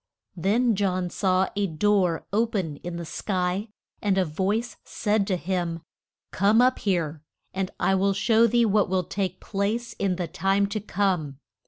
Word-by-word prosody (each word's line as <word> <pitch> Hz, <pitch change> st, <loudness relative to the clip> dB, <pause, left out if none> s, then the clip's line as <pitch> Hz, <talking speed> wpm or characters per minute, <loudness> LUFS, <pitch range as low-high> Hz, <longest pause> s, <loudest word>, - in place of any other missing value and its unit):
Then 220 Hz, +7 st, +2 dB
John 185 Hz, -3 st, 0 dB
saw 185 Hz, -1 st, +1 dB
a 205 Hz, -1 st, +1 dB
door 180 Hz, 0 st, +1 dB
o 225 Hz, +3 st, +3 dB
pen 180 Hz, -10 st, -3 dB
in 175 Hz, +2 st, -6 dB
the 170 Hz, 0 st, -5 dB
sky, 185 Hz, +3 st, -2 dB, 0.3 s
and 200 Hz, -2 st, +1 dB
a 190 Hz, -, +3 dB
voice 200 Hz, +9 st, -2 dB
said 210 Hz, -2 st, 0 dB
to 190 Hz, -, +1 dB
him, 175 Hz, -2 st, -2 dB, 0.5 s
Come 205 Hz, +4 st, +3 dB
up 255 Hz, +1 st, +4 dB
here, 165 Hz, -6 st, -1 dB, 0.3 s
and 190 Hz, -1 st, -2 dB
I 195 Hz, -, +2 dB
will 195 Hz, +1 st, +2 dB
show 220 Hz, +3 st, +4 dB
thee 235 Hz, +1 st, +3 dB
what 210 Hz, -2 st, +2 dB
will 185 Hz, -1 st, +1 dB
take 185 Hz, 0 st, -3 dB
place 215 Hz, +4 st, -2 dB
in 195 Hz, -2 st, +1 dB
the 175 Hz, -1 st, -3 dB
time 195 Hz, +4 st, +1 dB
to 215 Hz, +1 st, -2 dB
come. 185 Hz, -9 st, -1 dB
195 Hz, 170 wpm, -25 LUFS, 180-210 Hz, 0.5 s, up